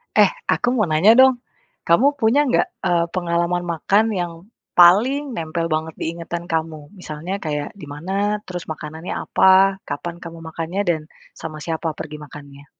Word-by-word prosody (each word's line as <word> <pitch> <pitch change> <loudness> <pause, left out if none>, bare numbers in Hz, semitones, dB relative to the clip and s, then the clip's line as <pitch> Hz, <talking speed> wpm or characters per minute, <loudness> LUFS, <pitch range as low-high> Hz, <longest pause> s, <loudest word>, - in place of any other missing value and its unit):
Eh, - - +6 0.2
aku - - +1
mau 215 -7 +1
nanya 160 +7 +5
dong, 260 -2 +5 0.4
kamu 195 +12 +5
punya 260 +6 +3
nggak, 250 - +2 0.2
eee, 170 -1 +2
pengalaman 175 0 0
makan 200 +7 +2
yang, 175 -1 -3 0.4
paling 245 +12 +5
nempel 165 -1 -2
banget 155 0 -2
di - - -3
ingatan 170 0 -5
kamu? 160 -2 -3
Misalnya 175 +4 -5
kayak 150 -4 -3
di 150 - -9
mana 195 +8 -2
terus 180 -3 -7
makanannya 155 +2 -6
apa 190 +1 +4
kapan 170 +4 -5
kamu 165 -1 -9
makannya 165 +4 -3
dan, 160 -2 +1 0.3
sama 155 -1 -7
siapa 165 0 -2
pergi 155 -1 -7
makannya? 145 -1 -12
170 Hz, 155 wpm, -21 LUFS, 155-195 Hz, 0.4 s, Eh